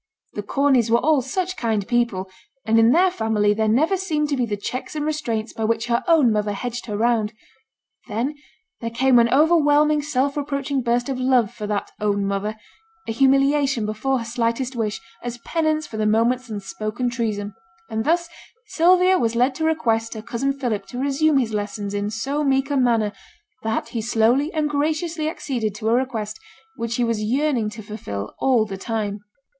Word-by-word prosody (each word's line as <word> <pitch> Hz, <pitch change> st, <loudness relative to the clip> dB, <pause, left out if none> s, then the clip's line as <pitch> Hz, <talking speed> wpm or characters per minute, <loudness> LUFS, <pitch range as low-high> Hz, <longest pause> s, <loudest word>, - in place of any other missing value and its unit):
The 205 Hz, -, -3 dB
Corneys 255 Hz, +1 st, +2 dB
were 235 Hz, -, +5 dB
all 295 Hz, +2 st, +3 dB
such 370 Hz, +8 st, -2 dB
kind 220 Hz, -, -1 dB
people, 235 Hz, -6 st, 0 dB, 0.4 s
and 225 Hz, +1 st, +4 dB
in 225 Hz, 0 st, +6 dB
their 365 Hz, +5 st, +4 dB
family 215 Hz, -5 st, +1 dB
there 220 Hz, +1 st, 0 dB
never 295 Hz, -, +3 dB
seemed 310 Hz, -6 st, -1 dB
to 285 Hz, -, +1 dB
be 250 Hz, -3 st, 0 dB
the 205 Hz, -1 st, -2 dB
checks 255 Hz, +8 st, -5 dB
and 300 Hz, -1 st, -2 dB
restraints 235 Hz, -8 st, -2 dB
by 225 Hz, -, -4 dB
which 225 Hz, +1 st, 0 dB
her 235 Hz, 0 st, 0 dB
own 310 Hz, -8 st, +5 dB
mother 210 Hz, -1 st, 0 dB
hedged 240 Hz, +4 st, -5 dB
her 210 Hz, -2 st, -3 dB
round. 225 Hz, -1 st, +1 dB, 0.7 s
Then 240 Hz, +6 st, -2 dB, 0.5 s
there 230 Hz, -, -3 dB
came 245 Hz, +1 st, +4 dB
an 235 Hz, 0 st, +3 dB
overwhelming 300 Hz, 0 st, +4 dB
self 280 Hz, -1 st, 0 dB
reproaching 280 Hz, -1 st, -2 dB
burst 240 Hz, 0 st, 0 dB
of 265 Hz, -2 st, -3 dB
love 255 Hz, -4 st, +2 dB
for 210 Hz, -, -6 dB
that 205 Hz, -1 st, -2 dB
'own 205 Hz, -1 st, 0 dB
mother'; 200 Hz, +2 st, -2 dB, 0.5 s
a -, -, -1 dB
humiliation 275 Hz, 0 st, +3 dB
before 215 Hz, +6 st, -1 dB
her 230 Hz, -, -4 dB
slightest 235 Hz, +2 st, -1 dB
wish, 220 Hz, -3 st, -2 dB, 0.2 s
as 240 Hz, 0 st, -5 dB
penance 310 Hz, -2 st, 0 dB
for 220 Hz, -, -8 dB
the 215 Hz, 0 st, +1 dB
moment's 235 Hz, +3 st, +1 dB
unspoken 215 Hz, +3 st, -4 dB
treason; 210 Hz, -3 st, -2 dB, 0.3 s
and 220 Hz, -1 st, -2 dB
thus 340 Hz, +5 st, +1 dB, 0.4 s
Sylvia 365 Hz, +2 st, +4 dB
was 230 Hz, -1 st, 0 dB
led 250 Hz, +3 st, +3 dB
to 315 Hz, +4 st, -2 dB
request 230 Hz, -8 st, 0 dB
her 215 Hz, -, -7 dB
cousin 240 Hz, +4 st, -1 dB
Philip 235 Hz, -8 st, -3 dB
to 245 Hz, -, -8 dB
resume 280 Hz, +3 st, +2 dB
his 235 Hz, -5 st, 0 dB
lessons 205 Hz, -1 st, -3 dB
in 205 Hz, 0 st, -1 dB
so 275 Hz, +7 st, -2 dB
meek 270 Hz, 0 st, +1 dB
a -, -, +1 dB
manner, 230 Hz, -5 st, +2 dB, 0.5 s
that 220 Hz, +1 st, -2 dB
he 230 Hz, -, -3 dB
slowly 235 Hz, +7 st, +2 dB
and 310 Hz, -2 st, 0 dB
graciously 310 Hz, +2 st, -1 dB
acceded 235 Hz, -10 st, -3 dB
to 220 Hz, 0 st, -2 dB
a -, -, +3 dB
request 230 Hz, -4 st, -1 dB, 0.4 s
which 230 Hz, -1 st, -3 dB
he 245 Hz, -, +1 dB
was 230 Hz, -2 st, 0 dB
yearning 250 Hz, 0 st, +1 dB
to 215 Hz, +1 st, -9 dB
fulfil 105 Hz, -, -6 dB
all 250 Hz, -5 st, +3 dB
the 195 Hz, -2 st, -6 dB
time. 210 Hz, -2 st, -3 dB
240 Hz, 185 wpm, -22 LUFS, 220-280 Hz, 0.7 s, in